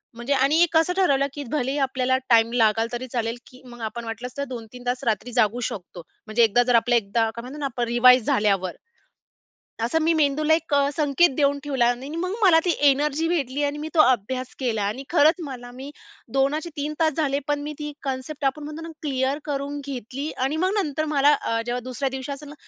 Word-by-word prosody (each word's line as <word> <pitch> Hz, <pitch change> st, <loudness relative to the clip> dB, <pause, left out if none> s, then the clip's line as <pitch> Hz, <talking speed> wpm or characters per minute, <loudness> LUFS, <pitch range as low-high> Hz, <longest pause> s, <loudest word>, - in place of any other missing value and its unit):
म्हणजे 240 Hz, +4 st, -2 dB
आणि 285 Hz, +6 st, +4 dB
कसं 325 Hz, +2 st, +3 dB
ठरवलं, 280 Hz, -7 st, +3 dB
की 290 Hz, -, -6 dB
भलेही 280 Hz, -1 st, -1 dB
आपल्याला 260 Hz, -1 st, 0 dB
टाइम 230 Hz, 0 st, +5 dB
लागला, 225 Hz, -1 st, +3 dB
तरी 255 Hz, +2 st, -4 dB
चालेल, 230 Hz, 0 st, -2 dB
की 255 Hz, -, -16 dB
मग 240 Hz, -1 st, -12 dB
आपण 230 Hz, +2 st, -5 dB
वाटलंस 235 Hz, +2 st, -6 dB
तर 280 Hz, -, -1 dB
2-3 245 Hz, +1 st, -8 dB
तास 250 Hz, +1 st, -1 dB
रात्री 230 Hz, +2 st, -1 dB
जागू 235 Hz, 0 st, +2 dB
शकतो. 180 Hz, -2 st, -9 dB, 0.3 s
म्हणजे 225 Hz, +2 st, +3 dB
एकदा 235 Hz, +3 st, +4 dB
जर 245 Hz, -1 st, +2 dB
आपल्या, 240 Hz, +1 st, +4 dB
एकदा 225 Hz, +1 st, 0 dB
काय 235 Hz, -, -5 dB
म्हणतो 265 Hz, +4 st, -9 dB
ना 285 Hz, -, -2 dB
आपण, 245 Hz, -2 st, -2 dB
रिवाईज 250 Hz, 0 st, +6 dB
झाल्यावर. 195 Hz, -3 st, +1 dB, 1.1 s
असं 315 Hz, +7 st, +1 dB
मी 330 Hz, +1 st, +3 dB
मेंदूला 305 Hz, +1 st, +2 dB
एक 325 Hz, -2 st, -1 dB
अ, 280 Hz, 0 st, +3 dB
संकेत 300 Hz, +2 st, +3 dB
देऊन 285 Hz, -1 st, +2 dB
ठेवला 265 Hz, -5 st, +1 dB
आणि 255 Hz, +3 st, -5 dB
मग 365 Hz, +3 st, -2 dB
मला 335 Hz, -4 st, +6 dB
ती 355 Hz, -, +2 dB, 0.2 s
एनर्जी 300 Hz, +3 st, 0 dB
भेटली 290 Hz, -4 st, -1 dB
आणि 285 Hz, +1 st, -2 dB
मी 310 Hz, +1 st, -5 dB
तो 315 Hz, -, +5 dB
अभ्यास 255 Hz, 0 st, +1 dB
केला. 225 Hz, -5 st, -1 dB
आणि 215 Hz, +7 st, -3 dB
खरंच, 320 Hz, -1 st, +5 dB
मला 245 Hz, -3 st, -8 dB
मी 270 Hz, +3 st, -8 dB, 0.4 s
2 275 Hz, +3 st, +2 dB
चे 340 Hz, -, -7 dB
3 295 Hz, +1 st, -3 dB
तास 315 Hz, -2 st, +3 dB
झाले, 285 Hz, -3 st, +1 dB
पण 290 Hz, 0 st, 0 dB
मी 300 Hz, +1 st, -5 dB
ती 295 Hz, -1 st, -5 dB
कन्सेप्ट, 270 Hz, +2 st, -4 dB
आपण 290 Hz, +2 st, -1 dB
म्हणतो 305 Hz, +2 st, -7 dB
ना 330 Hz, -, -7 dB
क्लिअर 270 Hz, 0 st, -1 dB
करून 285 Hz, 0 st, -3 dB
घेतली 270 Hz, +3 st, -5 dB, 0.2 s
आणि 300 Hz, +3 st, -2 dB
मग 380 Hz, -, +1 dB
नंतर, 310 Hz, -1 st, -2 dB
मला 285 Hz, +1 st, +5 dB
अ, 230 Hz, 0 st, -1 dB
जेव्हा 245 Hz, +1 st, -2 dB
दुसऱ्या 255 Hz, +2 st, -2 dB
दिवशी 265 Hz, +1 st, -5 dB
असेल 285 Hz, +1 st, -8 dB
ना, -, -, -10 dB
270 Hz, 210 wpm, -24 LUFS, 240-295 Hz, 1.1 s, रिवाईज